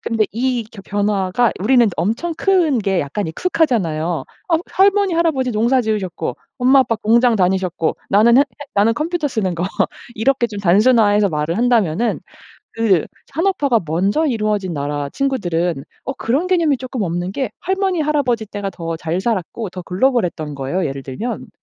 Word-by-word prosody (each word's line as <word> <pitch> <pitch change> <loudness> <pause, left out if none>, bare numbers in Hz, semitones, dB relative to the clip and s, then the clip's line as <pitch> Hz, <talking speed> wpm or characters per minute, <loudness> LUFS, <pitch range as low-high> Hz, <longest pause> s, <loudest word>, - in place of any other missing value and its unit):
근데 225 -2 0
이 245 +1 -1
겨 200 - -11
변화가 205 +2 +1
우리는 245 +4 +4
엄청 225 - -1
큰 350 -9 +2
게 195 -4 0
약간 145 +8 -3
익숙하잖아요. 175 - 0 0.2
어 335 - +3 0.2
할머니, 395 -1 +3
할아버지 315 -7 +1
농사 235 +4 +2
지으셨고 210 -5 -3 0.2
엄마 260 +2 +5
아빠 255 -3 +3
공장 235 +2 +3
다니셨고 185 -3 0
나는 225 +4 +5
했 - - +8
했 285 +1 -11
나는 210 +3 +3
컴퓨터 325 +3 -1
쓰는 210 -9 -1
거 170 - -1 0.5
이렇게 245 +2 +1
좀 205 -3 -7
단순화해서 205 +2 +4
말을 155 +1 -2
한다면은 230 -3 +1 0.5
그 210 -8 +2 0.3
산업화가 295 - +1
먼저 195 - +1
이루어진 210 - -1
나라 145 0 -3
친구들은 175 - -1 0.2
어 270 - -3
그런 265 +6 -1
개념이 335 -6 +2
쪼끔 255 -1 -5
없는 175 0 -2
게 265 0 -2
할머니, 380 -2 0
할아버지 280 -7 0
때가 205 -1 -5
더 165 -3 -5
잘 165 +3 -2
살았고 215 0 -2
더 180 0 -7
글로벌했던 180 - 0
거예요 140 +7 -2
예를 135 -1 -4
들면. 140 - -5
220 Hz, 355 characters per minute, -19 LUFS, 180-265 Hz, 0.5 s, 했